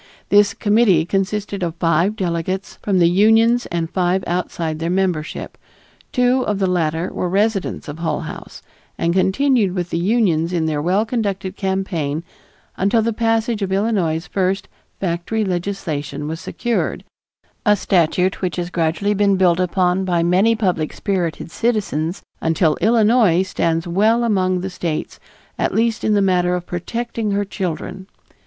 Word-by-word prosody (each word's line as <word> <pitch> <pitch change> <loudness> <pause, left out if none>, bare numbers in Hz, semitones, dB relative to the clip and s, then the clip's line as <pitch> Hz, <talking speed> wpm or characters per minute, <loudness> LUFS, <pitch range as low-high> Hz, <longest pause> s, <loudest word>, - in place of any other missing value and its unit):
This 205 0 +4
committee 205 -6 +3
consisted 195 +2 -2
of 170 -2 -2
five 170 +4 +1
delegates 185 0 -3
from 200 -2 0
the 170 -2 +5
unions 225 +6 +4
and 170 -1 -2
five 185 +2 0
outside 165 -2 -2
their 165 +1 -2
membership. 180 -4 -2 0.5
Two 250 0 +2
of 210 -5 -1
the 195 - +1
latter 170 -2 -1
were 180 - -2
residents 200 -1 0
of 150 +2 -7
Hull 165 - -1
House, - - -9 0.3
and 170 0 0
continued 195 +1 +2
with 180 -1 -3
the 165 - 0
unions 180 -4 +1
in 165 -2 0
their 155 -2 -1
well 190 +7 +1
conducted 200 -5 -2
campaign 180 -6 -2 0.5
until 210 +4 +2
the 230 0 0
passage 225 0 0
of 195 -1 -2
Illinois's 190 -6 0
first 195 0 -1 0.3
Factory 185 +5 -1
Legislation 175 -6 -3
was 160 +1 -4
secured, 235 +5 -2 0.6
a 210 -2 +4
statute 180 0 +1
which 180 -2 -1
has 175 0 -4
gradually 170 +5 0
been 200 -1 +2
built 180 -2 +3
upon 180 +1 +1
by 175 -3 +1
many 190 +7 +3
public 180 -8 -1
spirited 175 -4 -2
citizens 195 -8 -1 0.2
until 160 -1 +2
Illinois 220 -3 +4
stands 165 -3 -1
well 215 +7 +2
among 185 -5 +1
the 190 +1 -4
States, 170 -3 -4 0.4
at - - 0
least 225 0 +1
in 215 - +2
the 200 - +3
matter 180 -1 +2
of 175 -1 -4
protecting 230 +5 -3
her 200 0 0
children. 190 0 -5
185 Hz, 150 wpm, -20 LUFS, 170-210 Hz, 0.6 s, the